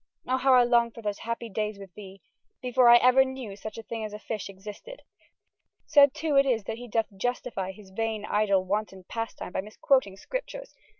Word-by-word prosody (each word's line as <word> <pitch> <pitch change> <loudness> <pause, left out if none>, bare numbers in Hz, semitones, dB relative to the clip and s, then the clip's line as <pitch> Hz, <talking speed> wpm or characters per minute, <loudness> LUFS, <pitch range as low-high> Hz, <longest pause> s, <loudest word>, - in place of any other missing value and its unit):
O 255 - +1
howe 260 0 +4
I 250 - +7
longe 235 -1 +2
for 230 - -10
those 205 -1 -3
happy 230 +1 -4
dayes 215 0 -3
with 195 -2 -12
thee, 195 -3 -12 0.4
before 250 -1 +4
I 240 - +10
ever 255 +2 +5
knew 260 -6 -6
such 215 +2 -8
a 225 - -7
thyng 225 0 -5
as 215 -1 -6
a - - -5
fysshe 210 -1 -5
existed! 210 - -10 0.8
Sad 285 -2 +5
too 310 -1 -1
it 275 - +6
is 230 -5 +1
that 225 +3 -5
he 245 - -8
doth 225 -1 -1
justifye 200 -3 -3
his 190 0 -15
vain 220 +1 -2
idle 200 -3 +2
wanton 195 -1 -3
pasttyme 225 -2 -6
by - - -1
misquoting 210 0 0
scriptures. - - -6
225 Hz, 200 wpm, -27 LUFS, 205-250 Hz, 0.8 s, I